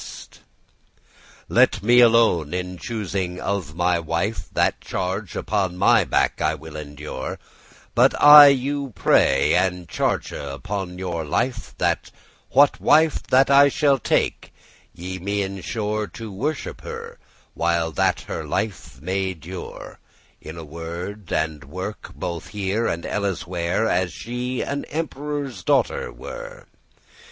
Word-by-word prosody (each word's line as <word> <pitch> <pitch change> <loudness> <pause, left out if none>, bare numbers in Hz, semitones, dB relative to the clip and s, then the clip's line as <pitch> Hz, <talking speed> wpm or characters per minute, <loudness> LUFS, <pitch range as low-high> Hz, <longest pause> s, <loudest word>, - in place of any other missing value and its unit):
*commend - - -10
to - - -18
him - - -29 1.0
"Let - - +3
me 120 +3 +5
alone 115 -9 +4
in 90 0 -4
choosing 95 -5 -3
of 95 -6 -3
my 90 0 +1
wife; 85 +6 -2
That - - +1
charge 95 +1 -4
upon 95 -3 -1
my 95 - +4
back - - +1
I 80 - +1
will 80 +1 -11
endure: 75 -2 -6 0.6
But - - +4
I 145 0 +11
you 140 -1 0
pray, 70 -7 +3
and 90 -2 0
charge - - -1
upon 90 +5 -5
your 90 -3 -3
life, 115 - -2
That - - 0 0.4
what - - +4
wife 160 -1 +4
that 135 +2 +4
I 140 +1 +7
take, 140 -3 +1 0.4
ye 95 +2 -7
me 100 +2 -1
assure 105 +2 -3
To 115 0 -9
worship* 140 +10 -4
her, - - -8 0.3
while 85 -1 0
that 75 - +1
her - - -5
life 100 - -4
may 95 +1 -1
dure, 85 +3 -9 0.4
*honour 80 +2 -8
In 80 - -11
word 85 +5 -7
and 80 -2 -1
work 95 +8 -6
both 85 -2 -5
here 105 +2 -1
and 85 - -3
elleswhere, 95 0 -1
As 90 -4 +1
she 125 +7 -4
an 140 0 -3
emperore's 145 -3 -4
daughter 475 - +1
were. - - -9
95 Hz, 135 wpm, -23 LUFS, 85-120 Hz, 1.0 s, I